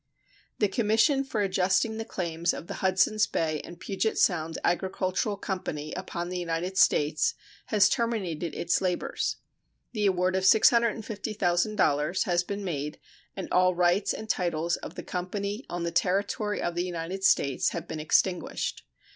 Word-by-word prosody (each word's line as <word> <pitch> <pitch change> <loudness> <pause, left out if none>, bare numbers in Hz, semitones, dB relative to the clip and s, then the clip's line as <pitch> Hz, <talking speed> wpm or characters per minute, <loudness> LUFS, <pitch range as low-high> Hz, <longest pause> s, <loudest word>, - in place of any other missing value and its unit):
The 210 - +3
commission 225 +6 +2
for 240 -6 -2
adjusting 195 +3 +1
the 225 - -4
claims 170 -3 -2
of - - -7
the - - -6
"Hudsons 190 +3 +3
Bay 155 -2 -1
and 170 0 -11
Puget 205 +4 -1
Sound 165 -3 +1
Agricultural 190 +3 0
Company" 155 -6 -4
upon 175 -1 -4
the 180 0 -3
United 175 +2 -2
States 150 +1 +3 0.3
has 205 -3 +5
terminated 190 -9 -1
its 175 - 0
labors. 180 -2 -1 0.6
The 210 -4 +1
award 185 0 +1
of 190 - 0
$650,000 210 -7 +2
has 175 -1 +1
been 200 +2 -5
made 150 -5 -3 0.4
and 190 - -5
all 185 0 +4
rights 180 +3 +2
and 220 - -5
titles 170 -4 0
of - - -9
the - - -6
company 200 +5 -4
on 175 -1 -3
the 170 - -1
territory 200 +4 0
of 175 - -1
the 175 +1 -1
United 180 +2 -4
States 140 -7 +3
have - - -6
been 160 - -5
extinguished. 175 +4 0
185 Hz, 150 wpm, -28 LUFS, 170-205 Hz, 0.6 s, has